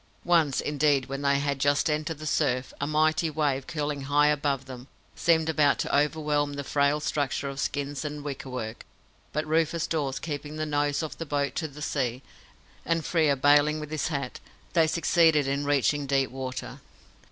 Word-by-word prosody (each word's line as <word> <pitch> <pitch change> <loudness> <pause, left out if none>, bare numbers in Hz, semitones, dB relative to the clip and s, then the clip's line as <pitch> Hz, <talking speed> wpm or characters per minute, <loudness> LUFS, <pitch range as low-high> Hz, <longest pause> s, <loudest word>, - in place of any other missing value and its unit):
Once, 165 -6 +3
indeed, 145 -2 +2
when 135 +1 -5
they 140 0 +3
had 140 -1 -1
just 145 +1 +2
entered 155 +1 -1
the 155 - -8
surf, 125 -3 0
a 140 - 0
mighty 155 +2 +2
wave, 145 -3 -1
curling 150 -2 -3
high 145 +1 +4
above 140 -2 0
them, 130 -1 -9 0.3
seemed 160 -2 +2
about 145 -5 +3
to - - -1
overwhelm 150 -1 +1
the 140 0 -4
frail 140 +2 +1
structure 145 -2 -1
of 135 0 -5
skins 145 0 -2
and 150 -1 -5
wickerwork; 125 -5 -5 0.5
but 150 +1 -1
Rufus 160 +1 +1
Dawes, 140 -5 -1
keeping 150 -1 -5
the 155 0 -2
nose 145 0 0
of 155 - -6
the 165 - -3
boat 145 -1 -1
to 160 - -1
the 150 +1 -9
sea, 130 -2 -2 0.6
and 165 -1 0
Frere 155 -5 +2
baling 145 +3 +4
with 150 0 -7
his 155 - -1
hat, 140 -5 -4 0.3
they 165 -3 +4
succeeded 160 -2 +3
in 140 +1 -1
reaching 145 0 +1
deep 135 -1 +1
water. 130 -1 -6
145 Hz, 175 wpm, -27 LUFS, 140-155 Hz, 0.6 s, high